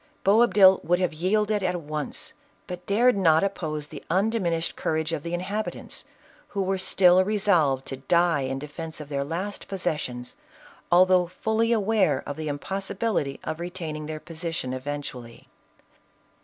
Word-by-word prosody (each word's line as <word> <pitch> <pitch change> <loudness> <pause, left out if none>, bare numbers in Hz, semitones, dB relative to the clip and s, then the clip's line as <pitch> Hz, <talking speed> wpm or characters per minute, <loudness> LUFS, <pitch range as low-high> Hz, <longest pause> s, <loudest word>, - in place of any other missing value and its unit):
Boabdil 200 -2 +6
would 175 +1 +2
have 180 -2 0
yielded 210 +5 +1
at 180 -1 0
once, 150 -2 -4 0.3
but 180 0 -8
dared 235 +4 +4
not 165 -4 +4
op 200 0 +1
pose 155 -4 -4
the - - -9
undiminished 180 -3 0
courage 160 +1 -1
of 155 - -2
the 170 +3 -3
inhabitants, 200 +5 -4 0.4
who 200 -1 -2
were 190 0 -1
still 185 0 +5
resolved 180 -10 +2
to 135 - -6
die 170 +4 +2
in 135 0 -2
defence 155 +3 -7
of 150 -2 -8
their 140 -1 -1
last 180 +8 -4
posses 180 -5 -1
sions, 125 0 -6 0.6
although 180 0 +5
fully 220 +5 0
aware 205 - +2
of 145 - -4
the 155 0 -5
impossibility 190 0 -2
of 155 +1 -4
re 175 +1 -4
taining 155 -4 -5
their 155 0 -5
position 165 -5 -4
eventually. 130 -3 -6
175 Hz, 155 wpm, -26 LUFS, 150-195 Hz, 0.6 s, Boabdil